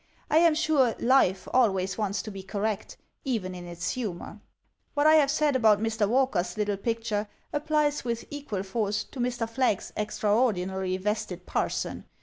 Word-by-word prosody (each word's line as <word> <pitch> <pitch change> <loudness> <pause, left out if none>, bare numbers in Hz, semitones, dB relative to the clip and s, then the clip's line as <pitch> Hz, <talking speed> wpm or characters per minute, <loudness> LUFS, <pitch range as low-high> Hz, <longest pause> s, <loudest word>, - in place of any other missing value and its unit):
I 315 - +6
am 335 -2 +5
sure 290 -7 +2
Life 215 -7 +3
always 195 -6 +2
wants 205 -2 -2
to 215 - -6
be 195 -1 -7
correct, 205 +2 -3 0.3
even 220 -9 -2
in 175 -1 -8
its 175 +1 -3
humor. 210 -3 -5 0.5
What 290 0 +2
I 310 - +7
have 300 -3 +5
said 300 -1 +2
about 220 -5 +5
Mr. 220 -2 0
Walker's 230 -9 +1
little 205 -1 0
picture 220 0 -2 0.3
applies 295 0 +1
with 235 -1 -3
equal 280 -10 -4
force 210 +1 -1
to 260 - -12
Mr. 240 -2 -1
Flagg's 230 -3 0
extraordinarily 200 -4 0
vested 195 -2 -3
parson. - - -2
215 Hz, 155 wpm, -27 LUFS, 195-260 Hz, 0.5 s, I